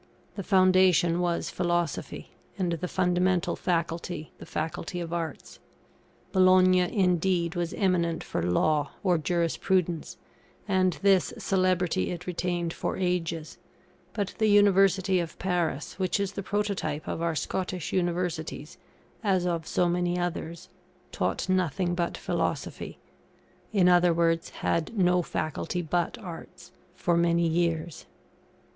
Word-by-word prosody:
The 200 - -5
foundation 185 -3 +4
was 175 -1 -1
Philosophy, 175 -1 -2 0.3
and 180 -3 0
the 170 +2 -2
fundamental 180 0 +1
Faculty 165 -2 -2
the - - -10
Faculty 165 +3 -4
of 170 -1 -5
Arts. 165 -3 -5 0.7
Bologna, 185 0 +5
indeed, 180 -2 +1
was 175 -2 -2
eminent 175 -4 +1
for - - -3
Law 145 - +1
or 180 -4 +3
Jurisprudence, 170 +1 0 0.5
and 185 -2 +2
this 195 -2 +3
celebrity 185 - +1
it 180 0 -5
retained 175 -1 -2
for - - -3
ages; 170 -3 -2 0.5
but 200 -3 -2
the 220 - +3
University 195 -2 +4
of 170 -2 -5
Paris, 175 -3 -2
which 185 +2 0
is 200 -1 -1
the 200 - -5
prototype 195 -7 -2
of - - -3
our 170 -1 0
Scottish 180 +1 -3
Universities, 175 -4 -2 0.4
as 190 -4 +2
of 170 -2 -2
so 180 - +1
many 175 0 0
others, 170 -1 -4 0.4
taught 90 - -1
nothing 185 -1 0
but 175 -1 -2
Philosophy - - -3 0.7
in 195 -4 +4
other 175 -1 +5
words, 165 0 +1
had 165 +7 -2
no 180 -1 +3
Faculty 170 +2 -3
but 170 +2 -1
Arts 180 -7 -10 0.2
for 175 -2 +1
many 170 0 +2
years. 165 - -1
175 Hz, 125 wpm, -27 LUFS, 170-185 Hz, 0.7 s, Bologna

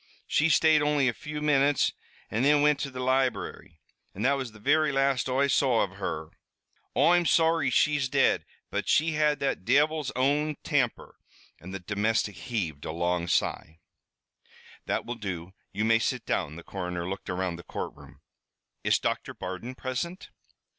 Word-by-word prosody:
She 155 +2 +2
stayed 155 -1 +5
only 150 -2 +2
a 125 - +1
few 150 +5 -6
minutes, 145 -1 +3 0.4
an' 110 - 0
thin 145 +2 +4
wint 150 -1 +4
to 145 - -3
the 130 -1 -8
library, 125 -10 -1 0.4
an' 100 - -4
that 135 - +4
was 130 -4 -3
the 110 - -15
very 145 +7 +2
last 135 -2 +1
Oi 135 +2 +2
saw 130 -4 +3
av 100 0 -6
her. 80 -5 -4 0.7
Oi'm 170 +5 +4
sorry 165 -3 +3
she's 140 +1 +2
dead, - - +3 0.3
but - - -2
she 160 +2 +3
had 150 -1 +2
that 135 -8 -1
divil's 145 +5 +2
own 145 +4 +1
temper!" 135 -7 -1 0.4
And 90 - -10
the 95 - -4
domestic 105 +2 0
heaved 85 - -4
a - - -4
long 85 +1 -1
sigh. 80 -1 -1 1.1
"That - - -1
will 120 - -3
do. 95 -5 -6 0.2
You 105 +3 -1
may 115 0 +4
sit - - -2
down." 75 - -1
The 85 - -10
coroner 90 -2 -4
looked 95 +1 -6
around 90 -1 -2
the 85 - -11
courtroom. - - -8 0.6
"Is - - +3
Doctor - - -3
Bardon 95 +7 -6
present?" 130 +9 -5
130 Hz, 165 wpm, -28 LUFS, 95-145 Hz, 1.1 s, stayed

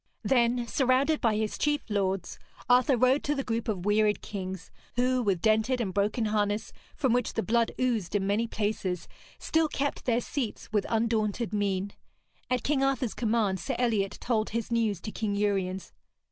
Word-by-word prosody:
Then, 240 -1 +2
surrounded 265 +6 +2
by 225 -3 +2
his 215 0 -2
chief 295 0 0
lords, 195 -3 -1 0.3
Arthur 250 +1 +4
rode 255 +4 +3
to 295 - +1
the 275 - -2
group 230 -1 -2
of 195 -5 -2
wearied 210 0 +2
kings, 190 -3 -6 0.2
who, 250 +1 +2
with 195 -6 0
dented 220 +4 +3
and 200 -6 -2
broken 210 +4 +1
harness, 210 0 0 0.2
from 260 -5 +1
which 245 -1 0
the 225 - 0
blood 230 +1 +2
oozed 230 -8 0
in 195 -1 +1
many 210 +4 +1
places, 205 -5 -2 0.3
still 320 0 +1
kept 285 -1 -2
their 240 -2 +2
seats 245 -3 -4
with 210 -2 +1
undaunted 225 -1 0
mien. 200 -1 0 0.6
At 255 0 0
King 280 -2 +1
Arthur's 265 -4 0
command 215 -5 0
Sir 265 +8 -3
Eliot 215 -5 0
told 220 -3 0
his 230 +1 -3
news 225 -5 +1
to 215 - -5
King 210 -2 -2
Uriens. 195 -2 -1
220 Hz, 175 wpm, -28 LUFS, 205-250 Hz, 0.6 s, Arthur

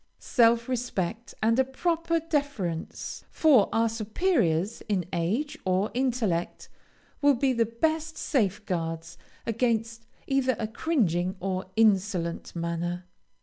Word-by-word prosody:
Self 235 -1 +3
respect, 230 -4 -3
and 230 +3 +3
a - - +6
proper 330 +5 0
deference 285 - -3
for 275 -10 +4
our 225 0 +3
superiors 220 - 0
in 190 -4 +1
age 240 - -1
or 185 +2 +1
intellect, 235 -9 -1 0.5
will 285 -1 +5
be 260 +2 +2
the 230 -2 +2
best 315 +7 -1
safeguards 180 - -1 0.3
against 230 0 -1 0.2
either 270 -2 +1
a 220 - -2
cringing 200 - 0
or 185 0 -2
insolent 195 -7 +1
manner. 170 +1 -3
225 Hz, 110 wpm, -27 LUFS, 185-265 Hz, 0.5 s, a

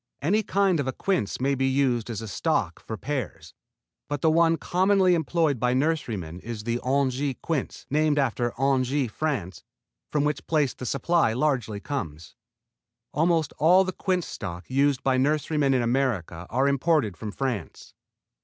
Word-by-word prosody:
Any 200 +9 +2
kind 195 -4 +1
of 140 - -1
a 130 - -1
quince 185 - -1
may 135 +2 +1
be 135 0 +1
used 130 -4 +1
as 115 -1 -4
a - - -6
stock 100 - -1
for 110 - -5
pears, 140 +4 -5 0.6
but 145 -1 -3
the 160 - +4
one 165 0 +4
commonly 185 +1 +3
employed 160 -4 +1
by 125 +2 +1
nurserymen 115 - -1
is 110 +1 -6
the 120 +1 -1
Angers 135 0 0
quince, 155 -5 -3
named 150 0 +2
after 120 -3 0
Angers, 135 -1 +1
France, 110 - -3 0.5
from 150 -1 +1
which 150 -1 -2
place 150 -5 +1
the 125 - -7
supply 140 -3 +2
largely 125 -6 0
comes. 85 - -6 0.8
Almost 165 -1 +1
all 180 +5 +6
the 185 - -3
quince 185 -2 -1
stocks 90 +1 -7
used 140 0 +2
by 130 -1 +2
nurserymen 150 +1 +1
in 125 - +2
America 115 -9 -1
are 130 +3 +1
imported 140 - +1
from 110 -2 -6
France. 125 - -4
135 Hz, 160 wpm, -26 LUFS, 120-155 Hz, 0.8 s, all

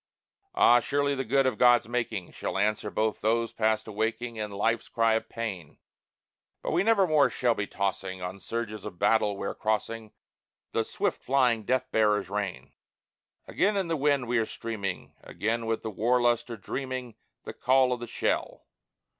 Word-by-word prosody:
Ah, 120 - +6
surely 140 +3 0
the 135 -1 -2
good 135 +3 +2
of 125 -5 0
God's 120 -2 +5
making 115 -6 -3
Shall - - -4
answer 105 +1 0
both 110 0 -1
those 115 +2 +1
past 110 0 +1
awaking 110 +2 -2
And 105 -1 -3
life's 115 +3 0
cry 115 -1 +2
of 110 - -1
pain; 95 -10 -5 0.9
But - - -2
we - - +2
nevermore 190 -9 +4
shall 120 -2 +1
be 105 -2 -3
tossing 95 -1 -3
On 90 +2 -6
surges 110 0 -4
of 90 - -8
battle 105 0 +2
where 100 - -3
crossing 110 0 -2 0.6
The - - +1
swift - - -2
flying 125 -5 +2
death 130 +2 0
bearers 105 -3 +2
rain. 90 -10 -4 0.7
Again 205 +1 +1
in 190 -3 -1
the 165 - +1
wind 140 -3 +1
we 120 0 +2
are 110 - +1
streaming, 100 -5 -5
Again 115 +1 -2
with 115 0 -1
the 110 - -3
war 120 +5 +2
lust 120 0 +1
are 115 - -5
dreaming 130 +2 -5 0.3
The - - -7
call 130 0 +3
of 125 - -4
the 120 - -6
shell. - - -2
115 Hz, 170 wpm, -28 LUFS, 105-125 Hz, 0.9 s, Ah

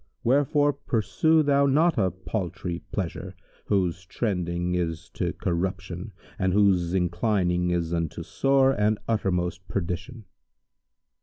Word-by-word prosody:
Wherefore 145 +3 +3
pursue 150 +6 +2
thou 140 -1 +3
not 155 +5 +3
a 95 -3 +3
paltry 90 -2 -4
pleasure, 95 -1 -4 0.3
whose 95 -3 0
trending 90 -4 -2
is 85 -2 -2
to - - -2
corruption 90 +2 -3 0.3
and 95 -2 +1
whose 95 -3 +3
inclining 90 -1 +1
is 85 -1 -1
unto 85 -2 -2
sore 135 -1 +3
and 105 -3 +1
uttermost 90 -4 -1
perdition." 100 +6 -4
95 Hz, 110 wpm, -26 LUFS, 90-115 Hz, 0.3 s, Wherefore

